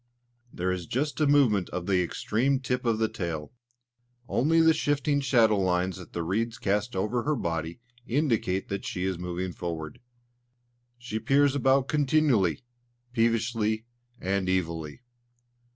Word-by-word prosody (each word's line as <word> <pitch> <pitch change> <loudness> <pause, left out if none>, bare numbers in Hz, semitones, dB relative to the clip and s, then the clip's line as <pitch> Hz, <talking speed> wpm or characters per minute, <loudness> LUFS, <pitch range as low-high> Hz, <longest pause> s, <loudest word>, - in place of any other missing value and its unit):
There 90 +1 -1
is 90 -3 -4
just 145 +5 -2
a 150 - +4
movement 125 -10 +3
of 90 -1 -4
the 95 -2 +2
extreme 125 +9 0
tip 125 -1 -2
of 115 -2 +2
the 110 0 +2
tail. 80 -7 -5 0.8
Only 160 +6 +2
the 160 0 +6
shifting 145 -1 0
shadow 115 -6 +3
lines 90 0 0
that 90 - -11
the 85 - -3
reeds 110 +7 -1
cast 105 +3 -1
over 105 +6 0
her 150 +4 0
body 85 - -3 0.3
indicate 115 -8 0
that 100 0 -3
she 90 - -3
is 95 -2 -1
moving 90 +1 -4
forward. 80 -3 -5 1.0
She 120 -3 -4
peers 135 +4 +3
about 135 0 +2
continually, 140 - +2 0.5
peevishly, 115 -1 +1 0.3
and 95 0 -1
evilly. 85 -1 -2
110 Hz, 140 wpm, -27 LUFS, 90-130 Hz, 1.0 s, the